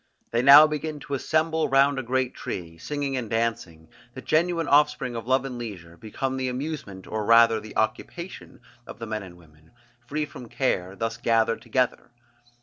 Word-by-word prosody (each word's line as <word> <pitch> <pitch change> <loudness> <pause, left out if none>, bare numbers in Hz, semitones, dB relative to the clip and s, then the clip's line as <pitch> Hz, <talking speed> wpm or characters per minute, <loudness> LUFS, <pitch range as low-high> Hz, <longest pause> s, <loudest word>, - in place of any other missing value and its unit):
They 115 - +1
now 140 +4 +10
begin 155 0 -4
to 140 - -7
assemble 160 +3 0
round 135 +1 +3
a - - -1
great 130 +1 -1
tree: 85 -2 -7
singing 145 - -3
and 120 -4 -4
dancing, 105 -9 -2 0.3
the 130 - -7
genuine 165 0 +1
offspring 145 -4 +2
of 115 0 -6
love 130 +1 +2
and 125 -2 -6
leisure, 90 -8 -8
become 130 +7 -4
the 130 -1 -1
amusement 125 -8 -5
or 110 -1 -3
rather 115 +1 +5
the 110 0 -10
occupation 130 +6 -4 0.3
of - - -9
the 115 - -6
men 110 -1 -4
and 90 -3 -12
women, 80 0 -22 0.3
free 150 +3 -2
from 125 -5 -11
care, 95 -8 -1
thus 115 +2 -3
gathered 115 -1 +1
together. 125 -2 -1
125 Hz, 175 wpm, -25 LUFS, 110-140 Hz, 0.3 s, now